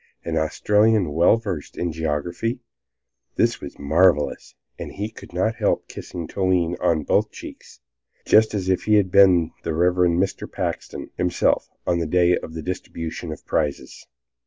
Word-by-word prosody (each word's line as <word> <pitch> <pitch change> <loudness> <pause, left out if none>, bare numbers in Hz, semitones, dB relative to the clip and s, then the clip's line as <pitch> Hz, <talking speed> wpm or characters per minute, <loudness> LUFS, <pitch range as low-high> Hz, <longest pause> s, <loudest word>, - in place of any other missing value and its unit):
An - - -2
Australian 105 +2 +2
well 85 +8 +4
versed 95 -10 -6
in 85 -1 -1
geography. 80 - -2 0.8
This - - +1
was - - -9
marvelous, 75 +1 +1 0.2
and - - -6
he 105 +2 -4
could - - -13
not 100 +6 -1
help - - 0
kissing 85 -3 -7
Toline 90 -3 0
on 85 -4 +1
both - - +1
cheeks, 70 - -12 0.4
just 110 0 +4
as 95 -2 -2
if 95 -1 0
he 110 - +4
had 100 -3 +2
been 90 -4 +5
the 80 -1 -3
Reverend 90 0 +2
Mr. 95 +1 -2
Paxton - - -5
himself, 90 0 +1 0.2
on 85 -1 +1
the 85 - -2
day 90 +1 +3
of 80 - -7
the 80 - -5
distribution 85 -2 -5
of 75 - -9
prizes. 75 -3 -3
90 Hz, 160 wpm, -22 LUFS, 80-95 Hz, 0.8 s, been